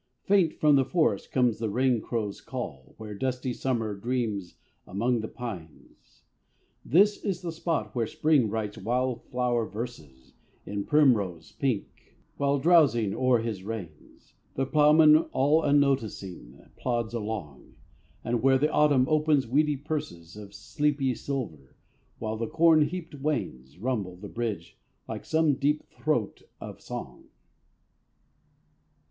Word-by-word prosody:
Faint 190 -5 +3
from 150 -2 +4
the 135 - +4
forest 135 - 0
comes 125 -4 +2
the 110 -1 -1
rain 125 +1 +1
crow's 105 -4 -3
call 90 - -7
Where 110 -1 -8
dusty 125 +3 -2
Summer 115 -5 -2
dreams 110 -4 -3 0.3
among 115 +5 0
the 110 - -4
pines. 95 -12 -10 0.6
This 200 - +3
is 190 -3 -2
the 170 - -3
spot 160 - -2
where 115 -2 -1
Spring 145 -6 +2
writes 105 -1 -4
wildflower 125 0 -1
verses 80 - -8 0.3
In 100 0 -4
primrose 105 - +2
pink, 130 -7 -4 0.2
while, 140 0 +1
drowsing 135 - +4
o'er 130 -3 +2
his 110 -5 -4
reins, 95 -8 -9 0.2
The 135 - 0
ploughman, 150 +2 +6 0.2
all 145 +4 +3
unnoticing, 110 - 0 0.2
plods 120 -2 -2
along: 105 - -6 0.5
And 120 -1 -1
where 135 0 +4
the 150 +3 +1
Autumn 145 -4 +4
opens 155 -3 +2
weedy 145 +4 +1
purses 130 - -5
Of 105 -1 -11
sleepy 145 -3 0
silver, 110 - -6 0.4
while 110 -1 -4
the 115 0 -2
corn 165 +2 +4
heaped 170 0 -6
wains 110 - -4
Rumble 105 -4 -2
the 100 +3 -9
bridge 110 -8 -5 0.3
like - - -6
some 160 -2 +2
deep 145 +2 0
throat 135 -9 -2 0.2
of - - -9
song. - - -8
125 Hz, 130 wpm, -27 LUFS, 105-145 Hz, 0.6 s, ploughman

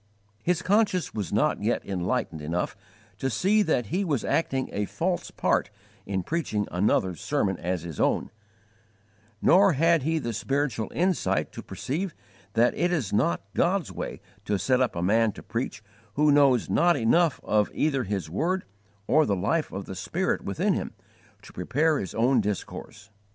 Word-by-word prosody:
His 180 +5 0
conscience 200 -3 +2
was 105 -6 -3
not - - +1
yet - - 0
enlightened 90 -4 -2
enough 85 +4 -2 0.4
to 135 - 0
see 195 - +2
that 155 - +1
he 195 - +1
was 150 - -1
acting 135 -5 0
a 105 0 -1
false 175 - -2
part - - 0 0.4
in 95 -2 -1
preaching 135 - -1
another's 90 -1 +1
sermon 105 -10 0
as 90 -1 -2
his 85 -4 -7
own; - - +1 1.1
nor 190 +1 +6
had 165 +3 +3
he 160 +4 0
the 120 -6 -3
spiritual 135 0 -1
insight 180 0 +1
to - - -8
perceive 165 +6 -4 0.4
that 115 +3 +3
it 175 +1 0
is 140 - -1
not 95 -3 +1
God's 185 -1 +1
way - - -5 0.3
to 105 - 0
set 125 +7 +2
up 125 - +1
a 85 - -2
man 110 +3 +3
to - - -11
preach 115 -2 -4 0.3
who 150 0 +4
knows 140 -4 +4
not 175 +1 +3
enough 145 +6 +3
of 105 -1 +2
either 140 -4 0
His 95 -6 -3
word 175 - -1 0.4
or 155 +5 +4
the 100 - +2
life 125 - 0
of 95 +1 -5
the - - -7
Spirit 90 - -1
within - - 0
him, - - -3 0.5
to - - -14
prepare 150 - +1
his 95 - -5
own 120 +2 +3
discourse. 105 -1 -5
130 Hz, 165 wpm, -26 LUFS, 100-165 Hz, 1.1 s, nor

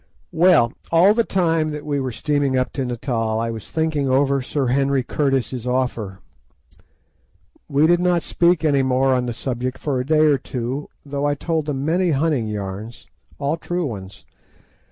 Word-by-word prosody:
Well, 165 -8 +4 0.2
all 175 +5 +6
the 230 +1 +2
time 165 -6 +1
that 150 -1 -6
we 145 -1 -1
were 130 -2 -2
steaming 140 +1 0
up 130 -1 -1
to 135 - -2
Natal 115 -3 -2
I 115 0 -1
was 110 -3 -8
thinking 155 -4 0
over 135 +1 +2
Sir 135 +2 -2
Henry 135 +1 +1
Curtis's 130 -3 -1
offer. 120 -6 -2 1.5
We 145 +2 +3
did 175 +1 +4
not 175 -2 +1
speak 170 -1 +2
any 140 -3 +3
more 130 0 +2
on 125 -1 0
the 120 - -2
subject 125 +1 -3
for 140 -4 -2
a - - -1
day 155 0 +4
or 145 -3 +3
two, 130 +3 -4 0.2
though 140 0 -3
I 145 0 +1
told 160 +1 -2
them 140 -2 -2
many 175 +3 +1
hunting 145 -5 +1
yarns, 105 +2 -6 0.3
all 145 +3 -1
true 175 0 -3
ones. 100 -7 -7
140 Hz, 175 wpm, -21 LUFS, 125-155 Hz, 1.5 s, all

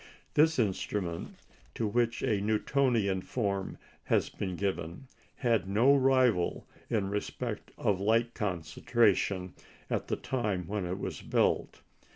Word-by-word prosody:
This 160 +2 +4
instrument, 95 -5 -2 0.4
to 115 - -1
which 115 +2 0
a 110 -6 +1
Newtonian 110 -2 +1
form 100 -3 -2 0.3
has - - +2
been 95 -3 -4
given, 90 +2 -3 0.3
had 115 -6 +1
no 120 +8 +5
rival 130 -8 +3 0.2
in 105 -3 0
respect 105 0 -4
of 100 -3 +1
light 115 +3 +2
concentration 95 +1 +1 0.4
at - - -1
the - - 0
time 105 -9 -2
when 100 -3 -2
it 90 +2 -3
was - - -5
built. - - 0
105 Hz, 125 wpm, -30 LUFS, 95-120 Hz, 0.4 s, no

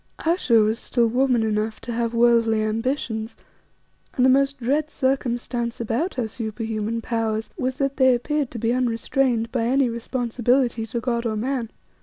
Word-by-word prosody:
Ayesha 330 -8 +2
was 220 +1 +3
still 240 -2 +1
woman 250 0 +2
enough 215 0 -1
to 240 - -6
have 230 0 -1
worldly 230 -2 +3
ambitions, 225 0 -2 0.8
and 250 - +3
the 260 - +6
most 275 +1 +2
dread 285 +5 0
circumstance 245 -3 -1
about 235 - -1
her 245 -3 -1
superhuman 220 0 -3
powers 225 -2 -2
was 255 0 -2
that 275 0 -1
they 260 -2 +5
appeared 290 +2 -1
to 240 - -7
be 230 +1 0
unrestrained 240 -1 0
by 235 -3 0
any 260 +1 +2
responsibility 240 0 0
to 235 +2 -3
God 235 -1 -1
or 220 - -2
man. 240 +1 -2
235 Hz, 160 wpm, -23 LUFS, 225-260 Hz, 0.8 s, the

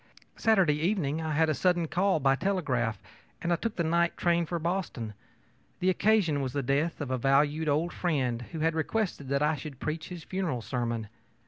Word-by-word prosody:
Saturday 195 -9 +4
evening 165 -4 0
I 160 -1 -2
had 160 +2 +3
a 155 - +2
sudden 175 +1 +1
call, 185 +1 +2
by 135 -1 +3
telegraph, 135 - 0 0.4
and 170 0 +1
took 230 -2 -2
the 170 - 0
night 170 +1 +1
train 170 -1 +2
for 175 - -2
Boston. 165 - -3 0.7
The 185 +1 +3
occasion 185 -8 +2
was 130 -2 -3
the 140 - -1
death 145 +6 0
of 140 -3 -3
a 130 - 0
valued 145 +4 +2
old 160 +4 +1
friend 130 -9 0
who 160 -2 -4
had 165 0 +2
requested 160 -3 -2
that 140 +1 +1
I 150 +1 +3
should 140 -1 -8
preach 155 +1 -4
his 175 -3 -7
funeral 170 - -2
sermon. 115 -3 -2
160 Hz, 190 wpm, -29 LUFS, 140-175 Hz, 0.7 s, Saturday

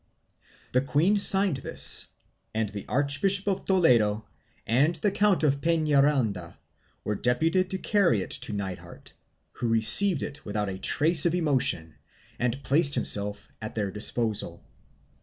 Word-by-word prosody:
The 125 - 0
queen 150 +10 -1
signed 195 -5 +4
this 135 - +6 0.5
and 110 -2 -3
the 100 -1 -10
Archbishop 145 +9 +1
of 195 -2 -4
Toledo 115 - 0 0.4
and 140 +9 -1
the 205 +4 -3
Count 200 -3 -1
of 140 -2 -1
Penaranda 140 - -2 0.5
were 105 - -4
deputed 160 - -2
to 190 - -4
carry 185 - -1
it - - -12
to - - -6
Nithard, 95 -3 -9 0.4
who 120 - -6
received 135 - +5
it 145 +1 -9
without 105 0 -5
a 95 0 -8
trace 160 - +2
of 170 - -3
emotion 130 - -2 0.5
and 125 +3 -4
placed 140 +2 +2
himself 105 0 0
at 110 - -9
their 100 -3 -4
disposal. 110 +1 -3
135 Hz, 140 wpm, -24 LUFS, 105-170 Hz, 0.5 s, this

